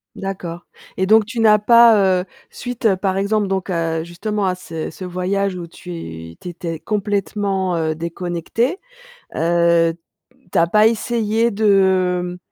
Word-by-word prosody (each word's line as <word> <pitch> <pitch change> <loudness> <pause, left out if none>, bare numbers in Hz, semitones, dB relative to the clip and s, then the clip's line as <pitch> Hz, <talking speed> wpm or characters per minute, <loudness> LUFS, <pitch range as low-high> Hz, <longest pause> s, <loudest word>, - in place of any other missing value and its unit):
D'accord, 180 -3 -6 0.3
et 190 - 0
donc, 215 +1 +5
tu 230 +2 -5
n'as 215 -2 +6
pas, 210 -4 +5
heu, - - -8 0.3
suite, 245 -4 -1
par 190 -1 0
exemple, 200 +1 +1
donc, 190 0 -2
heu, 165 -1 -1
justement 200 +5 -3
à 185 - +1
ce 165 -3 -6
ce 185 - -8
voyage 185 +2 -1
où 175 -1 -6
tu 85 - -9
tu 180 - -7
étais 165 -2 -6
complètement, 200 -2 -1
heu, 160 -1 -1
déconnectée, 175 - -2 0.6
heu, 170 0 +3 0.6
tu - - +1
as 165 - +4
pas 210 +5 +5
essayé 230 0 0
de 185 -3 +2
190 Hz, 145 wpm, -19 LUFS, 170-210 Hz, 0.6 s, n'as